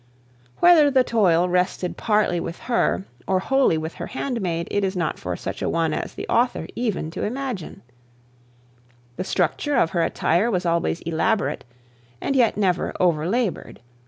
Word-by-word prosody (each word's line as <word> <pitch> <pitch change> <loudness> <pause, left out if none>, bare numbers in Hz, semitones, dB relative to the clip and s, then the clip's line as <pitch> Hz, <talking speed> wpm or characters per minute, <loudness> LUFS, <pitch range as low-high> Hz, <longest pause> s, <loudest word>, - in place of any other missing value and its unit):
Whether 330 -4 +7
the 260 -2 +4
toil 180 -8 +3
rested 180 0 0
partly 210 -5 +1
with 170 - -5
her, 100 - 0 0.2
or 190 - +2
wholly 265 -3 +2
with 160 +1 -4
her - - -4
handmaid, 195 -11 -3
it 205 - 0
is 190 0 -1
not 170 -3 -2
for - - -4
such - - -6
a - - 0
one 165 -2 0
as - - -4
the - - -6
author 245 +1 +1
to 200 -9 -2
imagine. 245 - -4 1.3
The - - -2
structure 190 - 0
of 170 -10 +2
her 170 - 0
attire 175 +6 +1
was 180 -5 -1
always 170 0 0
elaborate, 170 - -1 0.5
and 275 - -2
yet 240 -6 +3
never 190 -4 0
over 170 -2 +2
laboured. 230 -3 -2
185 Hz, 160 wpm, -23 LUFS, 170-240 Hz, 1.3 s, Whether